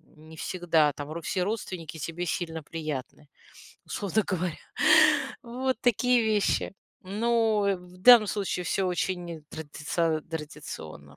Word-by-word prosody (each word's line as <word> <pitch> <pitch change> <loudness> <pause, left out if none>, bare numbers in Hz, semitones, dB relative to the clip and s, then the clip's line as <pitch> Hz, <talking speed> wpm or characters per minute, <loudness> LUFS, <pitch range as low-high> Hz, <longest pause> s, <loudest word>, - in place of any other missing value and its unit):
Не 155 +1 -14
всегда 165 -5 +2
там 145 +1 -7
ру 170 +1 -5
все 180 +3 -1
родственники 185 -6 -4
тебе 170 +4 -4
сильно 160 -2 -3
приятны, 150 -3 -6 0.6
условно 205 +1 -1
говоря. 180 -3 -2 0.9
Вот 255 +2 -2
такие 245 0 +3
вещи. 210 -2 +1 0.3
Но, 220 +1 +1
э, 195 - +2
в 180 0 -15
данном 230 +2 +8
случае 195 -3 -2
всё 190 -1 0
очень 175 -3 -3
традициа 160 +1 -2
традиционно. 150 - -8
175 Hz, 125 wpm, -27 LUFS, 160-205 Hz, 0.9 s, данном